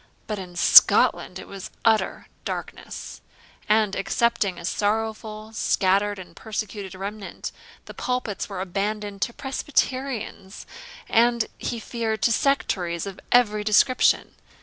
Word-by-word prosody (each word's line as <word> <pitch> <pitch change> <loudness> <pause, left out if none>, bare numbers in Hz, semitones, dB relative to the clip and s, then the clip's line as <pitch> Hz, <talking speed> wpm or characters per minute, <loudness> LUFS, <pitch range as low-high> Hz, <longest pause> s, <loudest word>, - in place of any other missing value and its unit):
But 210 -2 -4
in 180 -2 -9
Scotland - - +6
it - - -9
was 195 -2 -8 0.2
utter 220 -1 +2 0.2
darkness; - - -6 0.5
and, 215 -2 +3
excepting 200 -2 0
a 170 - -7
sorrowful, 215 +2 -2
scattered, 200 0 +2
and 175 -3 -11
persecuted 210 -3 -5
remnant, 200 +1 -6 0.3
the - - -10
pulpits 245 -5 -3
were 190 -2 -4
abandoned 200 +2 -3
to 235 - 0
Presbyterians, 260 -6 -2 0.4
and, 235 0 +3
he 235 - -3
feared, 220 -2 -3
to 235 - +4
sectaries 185 -11 0
of 195 -1 -7
every 215 -4 +4
description. 215 +5 +3
210 Hz, 120 wpm, -24 LUFS, 195-230 Hz, 0.5 s, Scotland